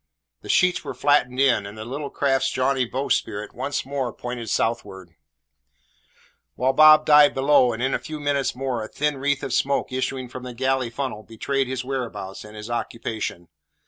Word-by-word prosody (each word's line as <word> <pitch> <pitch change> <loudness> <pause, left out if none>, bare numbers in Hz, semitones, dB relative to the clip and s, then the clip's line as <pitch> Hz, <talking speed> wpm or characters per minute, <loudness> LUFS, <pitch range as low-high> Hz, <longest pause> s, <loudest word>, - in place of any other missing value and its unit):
The - - -12
sheets 180 -1 +3
were - - -6
flattened 130 -3 +2
in, 125 -7 +3
and 100 +2 -10
the 110 - -7
little 140 +4 -5
craft's 135 -1 +1
jaunty 130 0 +1
bowsprit 115 -4 -2
once 140 +1 -3
more 135 -3 -2
pointed 120 -1 -6
southward; 95 -7 -2 1.4
whilst 130 +2 0
Bob 155 0 +8
dived 150 -1 +6
below, 135 -2 +4
and 115 +2 -4
in 130 - +1
a - - 0
few 155 -1 -7
minutes 145 -3 0
more 125 -3 -2
a - - -6
thin 150 +2 -1
wreath 140 0 0
of 135 - -3
smoke 140 0 0
issuing 130 0 -2
from 130 +1 -8
the 125 -1 -8
galley 130 0 0
funnel 125 -3 -4
betrayed 130 +5 -2
his 130 0 -4
whereabouts 115 -8 -5
and 105 0 -12
his 105 0 -8
occupation. 110 -6 -4
130 Hz, 175 wpm, -23 LUFS, 115-140 Hz, 1.4 s, Bob